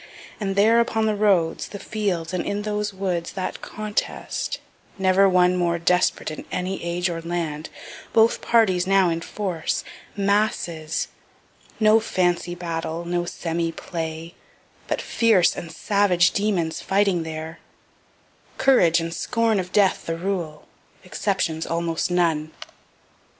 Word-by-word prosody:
And 195 -2 -2
there, 220 +4 +5
upon 225 -1 +1
the 215 -1 +1
roads, 190 -6 +2
the 200 - -8
fields, 190 -6 -2
and 180 - -1
in 205 +1 -2
those 210 -1 -2
woods, 185 -3 -3
that 190 -2 -4
contest, 215 0 -3 0.4
never 190 0 +4
one 180 0 +4
more 170 -1 +1
desperate 180 -1 +1
in 155 - -7
any 185 +1 -3
age 175 +1 -1
or 170 -2 -3
land 165 -3 -3 0.4
both 225 0 +4
parties 190 -6 +3
now 195 -2 +4
in 165 0 -2
force 180 -4 -3 0.3
masses 195 -6 0 0.7
no 215 0 +6
fancy 175 -5 0
battle, 165 -1 -4
no 175 0 -1
semi 165 -1 -2
play, 165 0 -5 0.5
but - - -2
fierce 220 -7 +3
and 170 - -7
savage 185 0 +2
demons 185 -6 -1
fighting 195 -3 +2
there 160 0 -6 1.0
courage 175 -12 +4
and 165 0 -4
scorn 230 +1 +1
of 180 -1 -4
death 200 -3 +2
the 165 0 -2
rule, 170 -4 -4 0.4
exceptions 185 -4 -1
almost 165 0 -1
none. 165 -3 +1
180 Hz, 130 wpm, -23 LUFS, 165-200 Hz, 1.0 s, no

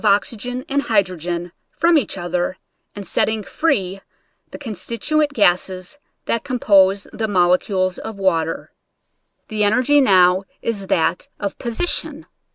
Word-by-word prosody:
oxygen 230 +4 0
and 280 +1 0
hydrogen 180 - -1 0.2
from 335 +2 +2
each 285 -9 +1
other 175 0 -2 0.4
and 200 -1 -7
setting 220 +2 0
free 195 - -1 0.5
the - - -9
constituent 280 - -1
gases 185 0 +1 0.3
that 230 - -1
com 255 -2 -3
pose 195 -3 +4
the 220 - -2
molecules 185 0 +1
of 220 -2 -7
water. 165 -4 -1 0.8
The 215 -1 0
energy 255 +8 +4
now 185 -4 +4
is 200 -4 -4
that 170 0 0
of 200 -1 -4
position. 245 +8 -2
200 Hz, 125 wpm, -20 LUFS, 185-235 Hz, 0.8 s, pose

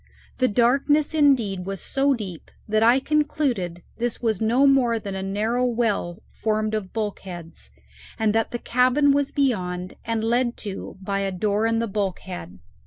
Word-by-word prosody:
The 255 - +4
darkness, 275 +7 +2
indeed, 235 - +2
was 195 -1 -4
so 275 0 +1
deep 190 -8 -8 0.2
that 215 0 +1
I 235 +4 +5
concluded 265 - -1 0.2
this 240 0 -1
was 220 -4 -1
no 240 +5 +3
more 260 -4 +4
than 205 -3 -5
a 190 - -3
narrow 215 +6 0
well 225 -8 -1
formed 215 0 -1
of 210 -4 -3
bulkheads, 180 - -6 0.5
and 220 -1 +1
that 225 0 +1
the 240 - -3
cabin 255 +4 +3
was 280 0 +1
beyond, 185 -10 -1
and 225 -1 -2
led 240 +1 +1
to 195 -1 -6
by 195 +1 -1
a 195 -1 -1
door 205 +3 0
in 225 0 +1
the 230 0 0
bulkhead. 190 - -4
225 Hz, 165 wpm, -24 LUFS, 195-250 Hz, 0.5 s, I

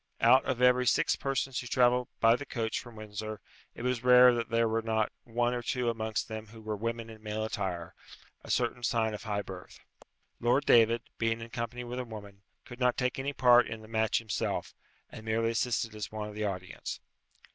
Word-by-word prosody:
Out 130 +3 +6
of 125 -1 -1
every 125 0 +5
six - - +3
persons 135 -1 -2
who 120 - -6
travelled 125 0 +3
by 115 +1 +6
the 145 - -5
coach 115 -5 -2
from 120 -2 -11
Windsor, 110 0 -6 0.4
it - - -7
was 125 -1 -1
rare 125 0 +8
that 120 -1 -2
there 115 0 +2
were 110 +1 0
not 110 -1 0
one 120 +1 0
or 120 - -2
two 120 0 0
amongst 110 -2 -3
them 110 0 -6
who 110 +2 -13
were 110 -1 -4
women 115 +2 -3
in 110 -1 -12
male 110 0 -3
attire; 90 -6 -4 0.5
a - - -12
certain 120 0 0
sign 115 -2 +1
of 105 - -6
high 100 -1 -1
birth. 90 -1 -10 0.6
Lord 125 +5 +2
David, 115 0 +5 0.2
being 115 0 +1
in 115 0 -9
company 120 0 -4
with 120 +1 -5
a - - -2
woman, 100 -4 -10 0.2
could 120 - -11
not 125 -1 +2
take 125 0 -1
any 135 +2 -1
part 125 -3 +5
in 110 0 -7
the - - -12
match 110 -1 +1
himself, 110 -2 -2 0.4
and 110 - -9
merely 115 +1 0
assisted 115 -1 -1
as 105 -1 -6
one 105 -1 -4
of 105 - -8
the 105 0 -2
audience. 90 -3 -5
115 Hz, 210 wpm, -30 LUFS, 110-125 Hz, 0.6 s, rare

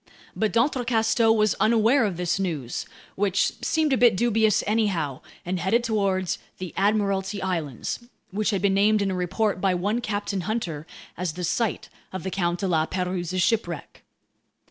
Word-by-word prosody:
But 220 -1 0
d'Entrecasteaux 230 -2 +2
was 215 -2 +3
unaware 225 +4 +4
of 190 -5 -2
this 180 +2 0
news—which 180 +4 -2
seemed 315 -3 +2
a - - +3
bit 235 -6 +5
dubious 220 -2 +3
anyhow—and 185 - -2
headed 220 +8 +2
toward 200 -5 0 0.2
the 185 -3 -6
Admiralty 200 -1 +1
Islands, 165 -10 -3 0.3
which 210 +2 0
had 200 -2 -1
been 200 -1 +3
named 205 +1 +3
in 195 - 0
a - - -2
report 185 +2 -1
by 190 -2 +2
one 205 +7 0
Captain 205 -4 -2
Hunter 175 -6 -3 0.3
as 180 -3 -3
the 180 +2 -6
site 220 +6 -1 0.2
of 185 - -5
the 190 - -3
Count 175 -2 -1
de 195 - 0
La 160 -3 +1
Pérouse's 180 -1 -1
shipwreck. 175 -7 -2
195 Hz, 155 wpm, -25 LUFS, 180-220 Hz, 0.3 s, bit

